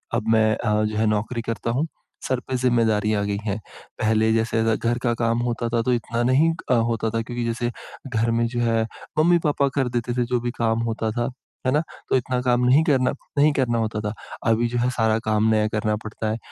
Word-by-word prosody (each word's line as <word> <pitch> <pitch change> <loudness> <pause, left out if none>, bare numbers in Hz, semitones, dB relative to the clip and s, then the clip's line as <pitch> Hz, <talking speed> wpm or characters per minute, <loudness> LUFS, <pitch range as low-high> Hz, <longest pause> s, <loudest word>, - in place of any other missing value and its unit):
अब 110 - -2
मैं 110 -1 +4
अ, 105 -1 +1
जो 105 0 -2
है 110 - +2
नौकरी 110 +3 -1
करता 115 0 -3
हूँ, 145 +7 0 0.4
सर 130 - 0
पे 130 - -2
ज़िम्मेदारी 115 -4 +2
आ 105 - +1
गई 100 0 -1
हैं। 105 0 -1 0.4
पहले 110 0 +2
जैसे 115 0 +1
अगर 110 0 +2
घर 120 +1 0
का 120 - +2
काम 115 0 0
होता 120 -1 -1
था, 115 0 +1
तो 125 +1 +1
इतना 120 0 -1
नहीं 135 +7 +4 0.2
अ, - - +6
होता 115 -1 +1
था 115 0 -1
क्योंकि 120 0 -4
जैसे 120 +1 -1 0.4
घर 115 -2 0
में 115 0 +2
जो 120 +1 -3
है 115 -1 +2 0.4
मम्मी-पापा 155 -4 +3
कर 135 -3 +1
देते 120 0 -2
थे 125 - +3
जो 125 +1 0
भी 120 0 -2
काम 115 -1 +1
होता 115 -1 -2
था, 120 +2 -1 0.4
है 130 - +3
ना? 150 - +3 0.3
तो - - +3
इतना 125 0 -1
काम 125 -1 +2
नहीं 135 +5 +5
करना 130 -5 +3 0.3
नहीं 150 +2 +5
करना 125 -4 +1
होता 110 -1 -1
था। 105 0 -3 0.4
अभी 115 +1 +2
जो 120 - -2
है 125 +1 +2
सारा 110 -3 +2
काम 110 0 +2
नया 110 -1 +3
करना 105 0 0
पड़ता 110 0 -4
है 110 - -2
115 Hz, 230 wpm, -23 LUFS, 110-125 Hz, 0.4 s, अ